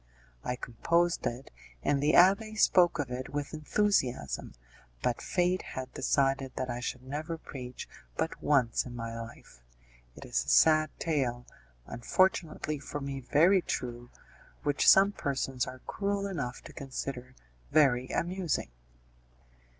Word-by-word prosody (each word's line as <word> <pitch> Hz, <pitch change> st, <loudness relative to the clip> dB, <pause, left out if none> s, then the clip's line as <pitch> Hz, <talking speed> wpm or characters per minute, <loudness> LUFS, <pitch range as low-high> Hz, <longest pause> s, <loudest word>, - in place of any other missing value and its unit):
I 125 Hz, -, -2 dB
composed 170 Hz, +9 st, 0 dB
it, 120 Hz, +3 st, -6 dB, 0.3 s
and 140 Hz, -1 st, +1 dB
the 150 Hz, +2 st, +3 dB
abbé 200 Hz, +5 st, +5 dB
spoke 175 Hz, -4 st, +5 dB
of 140 Hz, -5 st, -3 dB
it 125 Hz, +1 st, -4 dB
with 145 Hz, +1 st, -4 dB
enthusiasm, 150 Hz, -, 0 dB, 0.5 s
but 120 Hz, -, 0 dB
fate 180 Hz, 0 st, +1 dB
had 130 Hz, 0 st, -7 dB
decided 135 Hz, 0 st, +1 dB
that 130 Hz, -1 st, -2 dB
I 120 Hz, -, -4 dB
should 125 Hz, +1 st, -4 dB
never 155 Hz, +5 st, -4 dB
preach 125 Hz, -5 st, -8 dB, 0.3 s
but -, -, -2 dB
once 130 Hz, -6 st, +2 dB
in 125 Hz, -1 st, -9 dB
my 115 Hz, -1 st, -5 dB
life. 115 Hz, -, -10 dB, 0.5 s
It -, -, -10 dB
is 60 Hz, -, 0 dB
a 70 Hz, -, -6 dB
sad 155 Hz, -, +5 dB
tale, 125 Hz, -7 st, -1 dB, 0.4 s
unfortunately 155 Hz, -, 0 dB
for 145 Hz, +1 st, -6 dB
me 140 Hz, -1 st, -4 dB
very 165 Hz, +9 st, +4 dB
true, 120 Hz, -5 st, -4 dB, 0.5 s
which 145 Hz, -1 st, +4 dB
some 195 Hz, +1 st, +7 dB
persons 135 Hz, -7 st, -2 dB
are 130 Hz, 0 st, -8 dB
cruel 200 Hz, 0 st, -2 dB
enough 140 Hz, -11 st, -4 dB
to -, -, -11 dB
consider 130 Hz, -1 st, -6 dB, 0.3 s
very 130 Hz, -4 st, +4 dB
amusing. 175 Hz, -, -2 dB
140 Hz, 135 wpm, -30 LUFS, 125-170 Hz, 0.5 s, some